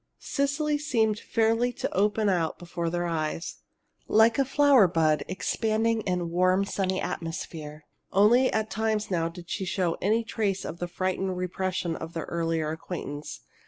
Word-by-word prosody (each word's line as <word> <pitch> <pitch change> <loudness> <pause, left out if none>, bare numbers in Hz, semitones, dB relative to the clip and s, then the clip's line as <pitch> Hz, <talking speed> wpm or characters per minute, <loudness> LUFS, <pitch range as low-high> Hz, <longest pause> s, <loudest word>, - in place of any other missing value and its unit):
Cecily 290 +1 0
seemed 225 -7 +1
fairly 230 +2 +1
to - - -4
open 210 +2 +2
out 175 -5 +1
before 170 -1 -4
their 175 +1 -1
eyes, 165 0 -3 0.5
like 225 +3 +4
a 275 - +4
flower 275 -6 +5
bud 155 -3 +2
expanding 220 +4 0
in 180 -2 -1
warm, 185 +2 +3
sunny 190 -1 -1
atmosphere. 155 -2 -5 0.3
Only 235 +7 +5
at 220 0 -1
times 215 -2 -1
now 165 -2 +1
did 170 0 -11
she 190 - -3
show 180 -2 -1
any 220 +4 +2
trace 205 -4 -2
of 170 - -6
the 175 - -2
frightened 185 +1 -2
repression 180 -1 -2
of 165 +1 -7
their 165 - -3
earlier 165 -2 -1
acquaintance. 150 -3 -6
185 Hz, 155 wpm, -27 LUFS, 170-220 Hz, 0.5 s, flower